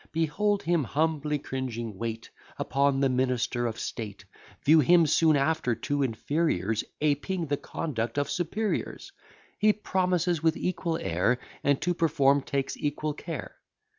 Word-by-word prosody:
Behold 195 +6 +1
him, 170 -2 +2
humbly 150 +2 0
cringing, 120 -6 -4
wait 115 +2 -5 0.3
Upon 140 +1 +1
the 135 - +4
minister 125 -1 0
of 115 -1 -5
state; 100 -4 -6 0.4
View 155 +3 +7
him 170 +3 +5
soon 155 +1 +4
after 140 -4 +1
to 145 +4 -2
inferiors 115 - 0 0.2
Aping 155 +4 0
the 145 -1 -1
conduct 120 -7 -4
of 145 - +1
superiors; 200 +5 -2 0.5
He 210 0 +5
promises 180 -5 0
with 160 0 +2
equal 170 -2 -1
air, 90 - +1 0.3
And 140 -1 +3
to 175 +2 +1
perform 145 -4 +3
takes 135 0 -2
equal 150 +1 -2
care. 160 0 -7
145 Hz, 135 wpm, -28 LUFS, 125-165 Hz, 0.5 s, View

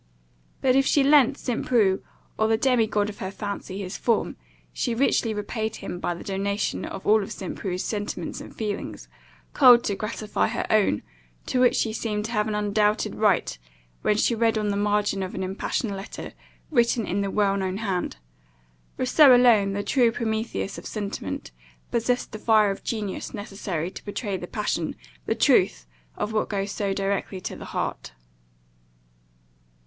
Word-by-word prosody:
But 255 -1 +3
if 270 0 +4
she 285 - +4
lent 280 -1 +5
St. 245 -3 -2
Preux, 205 -6 +2 0.3
or 220 - +2
the 220 0 +3
demi 245 -2 +3
god 205 -1 0
of 210 - -8
her 190 - -3
fancy, 200 -1 -5
his 185 +1 -5
form, 230 -3 +1 0.4
she 230 - -1
richly 235 -2 +2
repaid 220 +1 -3
him 175 - -6
by 175 - -2
the 170 - -9
donation 200 +1 -2
of 190 - -7
all 215 0 +4
St. 225 - -6
Preux's 185 -3 -3
sentiments 205 -1 -4
and - - -11
feelings, 210 -2 -4 0.5
culled 245 -3 +7
to 200 - -1
gratify 215 0 -1
her 235 - -2
own, 210 - +3 0.4
to 255 - 0
which 250 - +4
he 220 - -3
seemed 210 -2 -2
to 225 - -5
have 210 -2 +1
an 215 - -1
undoubted 210 0 +1
right, 205 - +1 0.4
when 210 - +2
she 235 - +2
read 230 -1 +2
on 210 -1 0
the 200 - 0
margin 205 -1 +1
of 185 0 -4
an 190 - -2
impassioned 195 +2 -2
letter, 195 +1 -7 0.4
written 235 -4 +2
in 200 +2 -1
the 200 - -1
well 200 0 +2
known 190 -1 -2
hand 195 -5 -2 0.8
"Rousseau 260 +1 +6
alone, 225 -5 +5
the 205 +1 -2
true 235 +2 +3
Prometheus 220 -3 -3
of - - -9
sentiment, 200 - -5 0.4
possessed 245 +2 0
the 215 - -7
fire 215 -2 +4
of 195 - -7
genius 210 -3 -4
necessary 195 -5 -4
to - - -10
pourtray 205 -1 -3
the 180 -1 -5
passion, 190 -7 -2 0.3
the - - +1
truth - - +3 0.3
of 215 - -2
which 215 - 0
goes 200 -1 -2
so 200 -1 -2
directly 195 0 -2
to - - -5
the - - -9
heart." - - -4
210 Hz, 175 wpm, -25 LUFS, 195-230 Hz, 0.8 s, culled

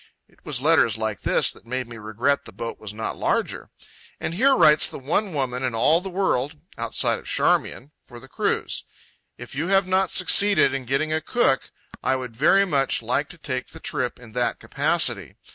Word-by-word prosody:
—It - - -29
was 130 -3 -3
letters 150 -9 +3
like 110 -3 -3
this - - +3
that - - -15
made 130 0 -3
me 115 -1 -10
regret 115 +6 -1
the - - -9
boat 115 0 -6
was 105 -2 -7
not 110 +1 -5
larger. - - -1 0.5
And - - -3
here 265 +9 +4
writes 150 -8 +5
the - - -8
one 170 +9 -1
woman 130 -4 -2
in 125 -3 -2
all 155 +9 +3
the 190 - -6
world—outside 150 - -1
of - - -15
Charmian—for 125 -3 -2
the 130 - -14
cruise: - - -2 0.5
"If - - -10
you 150 +5 -2
have 195 0 +3
not 185 0 +2
succeeded 185 -4 +4
in 135 -2 -4
getting 140 +5 0
a 160 - 0
cook 200 - +1 0.3
I 130 - +1
would 130 -2 -5
like 115 - -19
very 195 +7 +5
much 140 -7 +1
to 135 +9 -2
take 130 -4 -4
the - - -12
trip 125 0 -3
in 120 -3 -13
that 120 0 -1
capacity. - - -1
135 Hz, 190 wpm, -23 LUFS, 120-165 Hz, 0.5 s, writes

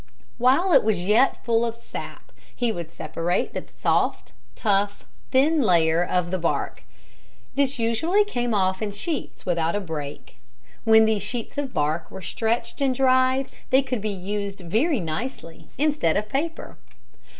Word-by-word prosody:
While 270 +10 +4
it 270 - +6
was 200 -5 0
yet 225 +7 +3
full 230 -1 +2
of 230 -1 -2
sap 235 - -9 0.2
he 240 -2 0
would 170 -6 -5
separate 165 +2 -2
the - - -5
soft, - - 0 0.2
tough, 205 -1 0 0.2
thin 275 +5 +4
inner 290 - +3
layer 165 -2 +4
of 180 -1 -1
the 185 - -1
bark. 165 - -1 0.7
This 280 0 +1
usually 320 - +2
came 245 -12 -2
off 190 0 +1
in 210 -2 -2
sheets 315 - -4
without 170 -1 0
a - - +1
break. 150 - -7 0.5
When 220 0 +7
these 220 -2 +1
sheets 240 -3 -4
of 275 -3 -3
bark 155 0 -1
were 190 - -9
stretched 225 +8 -2
and 265 -2 +2
dried 260 0 +3 0.2
they 265 +1 +4
could 250 -4 -3
be 215 - -1
used 200 +1 -4
very 235 - +1
nicely 165 -2 -5
instead 295 - +2
of 210 +1 -2
paper. 320 +7 -3
220 Hz, 160 wpm, -24 LUFS, 175-260 Hz, 0.7 s, When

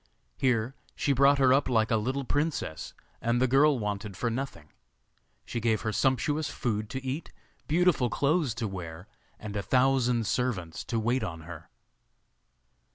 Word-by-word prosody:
Here 125 -1 +1 0.2
she 140 - +1
brought 140 +2 +5
her 130 -2 +5
up 135 0 +2
like 110 -2 +2
a - - +4
little 130 +6 -1
princess, 145 - -2 0.3
and 120 +1 +1
the 130 - +3
child 135 +1 +4
wanted 105 -2 -4
for 120 +1 -1
nothing. 115 - -5 0.8
She 120 - -3
gave 110 -2 +1
her 110 - -1
sumptuous 145 +5 +1
food 110 -4 -2
to 130 0 -5
eat, 135 +5 -4 0.4
beautiful 160 -6 +3
clothes 145 0 +1
to 120 -2 -2
wear, 90 -1 -7 0.3
and 105 -1 -7
a 100 - 0
thousand 125 -1 +2
servants 100 -9 -2
to 115 - -1
wait 120 +3 0
on 85 -5 -5
her. 85 -1 -10
120 Hz, 160 wpm, -28 LUFS, 105-135 Hz, 0.8 s, brought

